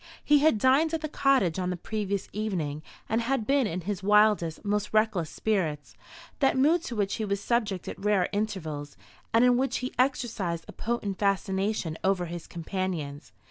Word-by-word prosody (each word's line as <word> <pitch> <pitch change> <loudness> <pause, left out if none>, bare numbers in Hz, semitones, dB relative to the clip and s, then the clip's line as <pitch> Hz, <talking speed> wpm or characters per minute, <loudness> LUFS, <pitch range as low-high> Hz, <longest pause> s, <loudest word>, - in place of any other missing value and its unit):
He 295 0 +5
had 300 -5 +4
dined 275 +8 +3
at 320 - -3
the 310 - -2
cottage 265 - +2
on 180 -1 -1
the 180 - -2
previous 200 +1 -3
evening, 175 -9 -2 0.3
and 225 +2 +1
had 240 -1 0
been 275 -2 +2
in 180 -1 -3
his 200 +2 -3
wildest, 210 -4 +3
most 210 0 -1
reckless 215 -7 +2
spirits 160 -8 -2 0.4
that 270 -1 +3
mood 310 +6 +4
to 240 - -5
which 200 -2 0
he 220 - -2
was 200 -1 -1
subject 210 -4 -1
at - - -7
rare 205 -3 +3
intervals, 165 -9 -3 0.3
and 230 +2 +5
in 245 -1 +5
which 265 +1 0
he 255 - -4
exercised 225 -10 0
a - - -8
potent 215 -4 -3
fascination 195 -3 0
over 190 -2 +1
his 170 0 -7
companions. 165 -4 -4
205 Hz, 180 wpm, -28 LUFS, 180-235 Hz, 0.4 s, He